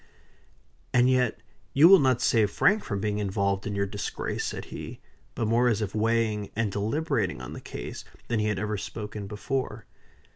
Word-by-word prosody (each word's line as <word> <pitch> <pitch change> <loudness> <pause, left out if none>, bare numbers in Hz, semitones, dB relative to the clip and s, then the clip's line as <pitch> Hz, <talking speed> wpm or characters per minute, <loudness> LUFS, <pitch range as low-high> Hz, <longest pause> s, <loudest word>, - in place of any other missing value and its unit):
"And 125 0 +5
yet 125 -3 +1 0.3
you 145 +5 +8
will 195 +1 +9
not 130 -3 +2
save 110 -5 +3
Frank 205 - +3
from 100 -4 -3
being 105 +1 -1
involved 100 -1 0
in 105 - -3
your 100 0 +1
disgrace," 100 +1 -4
said - - -4
he; - - -7 0.4
but 115 - -1
more 120 +3 +3
as 110 -4 +2
if 105 -3 -3
weighing 110 -1 +1
and 110 -2 0
deliberating 115 - -1
on 65 - -7
the - - -8
case - - -7 0.2
than 115 -2 0
he 105 - +1
had 105 -2 0
ever 105 +1 -2
spoken 105 0 -6
before. 110 +1 -3
110 Hz, 180 wpm, -27 LUFS, 105-120 Hz, 0.4 s, will